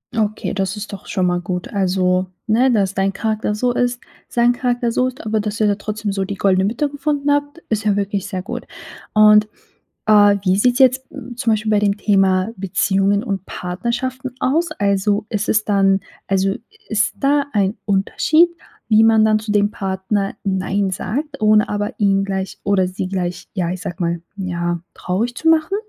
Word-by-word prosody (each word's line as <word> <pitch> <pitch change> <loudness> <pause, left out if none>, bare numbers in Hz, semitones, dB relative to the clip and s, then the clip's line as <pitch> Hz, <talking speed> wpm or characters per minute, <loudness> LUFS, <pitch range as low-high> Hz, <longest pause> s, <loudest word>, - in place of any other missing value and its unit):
Okay, 215 -1 -1
das 195 0 -2
ist 210 0 -7
doch 195 - -9
schon 185 - 0
mal 175 0 0
gut. 180 0 -4
Also, 185 -1 +1 0.2
ne, 245 +4 +3
dass 195 -4 +1
dein 195 0 +1
Charakter 215 0 -2
so 245 +3 0
ist, 245 0 0 0.3
sein 240 0 +3
Charakter 245 -1 -1
so 255 0 +2
ist, 255 -1 -8
aber 215 0 0
dass 210 +1 -4
ihr 215 - +3
da 205 - +2
trotzdem 210 0 -4
so 195 -1 -1
die 200 +1 -4
goldene 190 -1 +2
Mitte 235 +9 0
gefunden 290 0 -2
habt, 290 +2 0
ist 220 -1 -1
ja 205 -2 +2
wirklich 200 -1 -2
sehr 190 -3 -4
gut. 190 - -6 0.5
Und, 210 0 +6 0.6
äh, 205 -1 +6
wie 185 0 +3
sieht's 245 +4 +2
jetzt 260 0 +4 0.3
zum 235 -1 0
Beispiel 215 0 -1
bei 210 - +4
dem 205 0 +1
Thema 195 -1 +2
Beziehungen 195 +1 +1
und 195 -5 -3
Partnerschaften 240 +8 -4
aus? 320 +5 +1
Also, 200 -1 0
ist 210 -1 -2
es 215 0 +2
dann 195 -1 +3 0.3
also, 195 0 +1 0.3
ist 215 0 +1
da 285 +1 +2
ein 200 -1 +1
Unterschied, 295 - +3 0.4
wie 220 0 +6
man 220 -1 +5
dann 215 0 +3
zu 215 0 -4
dem 205 0 +2
Partner 195 +1 -2
nein 195 +1 0
sagt, 275 +10 -4
ohne 215 0 +4
aber 205 +1 -3
ihn 195 -1 +3
gleich 190 -1 -4
oder 190 -2 +2
sie 185 0 -4
gleich, 180 -2 -4
ja, 175 -2 -1
ich 180 0 -5
sage 175 - -5
mal, 170 -1 -1 0.2
ja, 175 -2 -2
traurig 225 +7 -2
zu 325 - +1
machen? 325 +4 +3
205 Hz, 185 wpm, -19 LUFS, 195-230 Hz, 0.6 s, Und